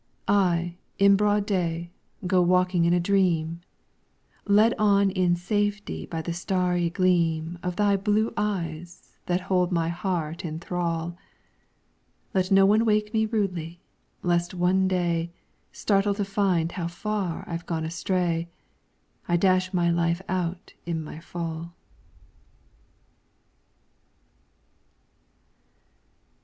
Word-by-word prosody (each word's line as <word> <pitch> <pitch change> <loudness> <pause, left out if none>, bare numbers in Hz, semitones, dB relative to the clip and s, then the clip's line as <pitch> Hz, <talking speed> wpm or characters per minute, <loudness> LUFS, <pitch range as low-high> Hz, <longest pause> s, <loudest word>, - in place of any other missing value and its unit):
I, 175 -3 +2 0.2
in 200 0 +6
broad 205 0 +2
day, 170 -4 -1 0.3
go 180 0 +3
walking 180 -1 +3
in 170 - +3
a - - +2
dream, 170 -3 +1 0.9
Led 215 +3 +5
on 200 -2 +4
in 180 -2 +2
safety 205 +3 -2
by 165 -1 -4
the 170 - -3
starry 180 -1 0
gleam 170 -2 +1
Of 180 -1 -3
thy 200 0 +3
blue 210 +3 +1
eyes 175 -5 -4
that 180 +1 +1
hold 180 0 +1
my 165 -2 +1
heart 170 -2 -3
in 160 -2 -4
thrall; 170 -1 -3 1.2
Let 185 -1 +1
no 195 -1 +6
one 210 +3 +4
wake 210 -1 +1
me 220 0 +2
rudely, 180 -6 -2 0.4
lest 175 0 0
one 185 +2 +2
day, 175 -2 0 0.4
Startled 200 0 +1
to 205 - 0
find 190 -4 +1
how 170 -2 -3
far 190 0 -3
I've 170 0 -5
gone 160 -2 -2
astray, 170 0 -1 0.8
I 175 - +2
dash 185 0 +2
my 175 -2 +2
life 170 +1 0
out 180 0 -3
in 165 -2 -3
my 155 0 -8
fall. 165 0 -6
180 Hz, 120 wpm, -26 LUFS, 170-195 Hz, 1.2 s, in